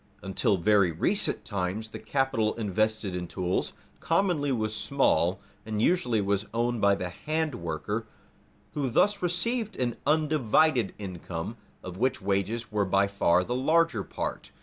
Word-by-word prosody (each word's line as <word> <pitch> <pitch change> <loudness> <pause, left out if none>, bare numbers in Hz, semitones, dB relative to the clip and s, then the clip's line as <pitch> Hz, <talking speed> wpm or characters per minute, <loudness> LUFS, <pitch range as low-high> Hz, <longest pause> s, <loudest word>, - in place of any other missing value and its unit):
Until 95 +1 +1
very 100 0 +3
recent 180 - 0
times 100 +2 -3
the - - -8
capital 135 -6 0
invested 110 -2 -1
in 90 -1 -4
tools 90 +1 -2 0.3
commonly 165 -5 +1
was 110 -4 -1
small, 95 - +2 0.2
and 110 -1 -3
usually 125 - +2
was 100 +1 0
owned 120 -1 0
by 100 0 +5
the 90 -2 -4 0.2
handworker 115 - -2 0.7
who 140 -3 -1
thus 205 - +2
received 210 +5 -1
an 120 -2 -2
undivided 150 -5 +2
income, 90 0 -6 0.3
of 90 0 -7
which 130 +4 +1
wages 100 +4 -1
were 105 -1 +1
by 100 +1 +3
far 90 -3 +2
the 120 - -3
larger 145 -3 +2
part. - - -5
110 Hz, 140 wpm, -28 LUFS, 95-140 Hz, 0.7 s, by